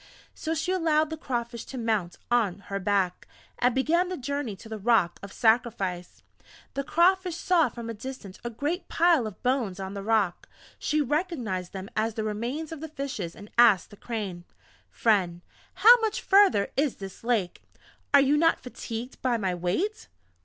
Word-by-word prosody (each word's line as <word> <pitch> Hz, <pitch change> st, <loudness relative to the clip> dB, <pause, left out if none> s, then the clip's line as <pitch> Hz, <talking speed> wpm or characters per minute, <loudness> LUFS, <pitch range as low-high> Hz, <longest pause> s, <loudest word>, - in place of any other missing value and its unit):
So 320 Hz, +1 st, -3 dB
she 360 Hz, +4 st, -1 dB
allowed 315 Hz, -4 st, +2 dB
the -, -, -2 dB
Crawfish 240 Hz, -5 st, -4 dB
to 265 Hz, -, -8 dB
mount 220 Hz, -7 st, -1 dB
on 210 Hz, -6 st, +1 dB
her 195 Hz, -, -1 dB
back, 190 Hz, -2 st, 0 dB, 0.3 s
and 245 Hz, -1 st, +2 dB
began 340 Hz, +7 st, +2 dB
the 370 Hz, -, -3 dB
journey 280 Hz, -4 st, -3 dB
to 210 Hz, -, -13 dB
the 220 Hz, -1 st, -6 dB
Rock 205 Hz, -5 st, +2 dB
of 200 Hz, -, -9 dB
sacrifice. 220 Hz, -7 st, 0 dB, 0.5 s
The 275 Hz, -, -2 dB
Crawfish 360 Hz, +3 st, +2 dB
saw 345 Hz, -3 st, +3 dB
from 235 Hz, -1 st, -8 dB
a 230 Hz, -, -4 dB
distance 220 Hz, -4 st, -8 dB
a 240 Hz, -, -3 dB
great 290 Hz, -, -3 dB
pile 330 Hz, -8 st, +3 dB
of 210 Hz, -, -10 dB
bones 245 Hz, -7 st, 0 dB
on 190 Hz, 0 st, -5 dB
the 200 Hz, -, -5 dB
Rock. 205 Hz, -4 st, 0 dB, 0.3 s
She 305 Hz, 0 st, +1 dB
recognized 255 Hz, -, -2 dB
them 190 Hz, 0 st, -6 dB
as 220 Hz, 0 st, 0 dB
the 220 Hz, -, -2 dB
remains 235 Hz, +9 st, -3 dB
of 325 Hz, -, -6 dB
the 320 Hz, -, -5 dB
Fishes, 270 Hz, -, -5 dB
and 205 Hz, 0 st, -12 dB
asked 230 Hz, -6 st, +5 dB
the -, -, -11 dB
Crane: 200 Hz, -6 st, -5 dB, 0.5 s
"Friend, 185 Hz, -6 st, +1 dB, 0.4 s
how 475 Hz, +2 st, +8 dB
much 440 Hz, -2 st, -1 dB
further 390 Hz, -, +4 dB
is 280 Hz, -2 st, +1 dB
this 195 Hz, +1 st, -9 dB
Lake? 225 Hz, -7 st, 0 dB, 0.5 s
Are 285 Hz, -, +7 dB
you 280 Hz, +2 st, +3 dB
not 330 Hz, +2 st, +3 dB
fatigued 245 Hz, 0 st, -7 dB
by 250 Hz, -2 st, +1 dB
my 190 Hz, -4 st, -1 dB
weight?" 270 Hz, -, -2 dB
235 Hz, 175 wpm, -27 LUFS, 200-300 Hz, 0.5 s, how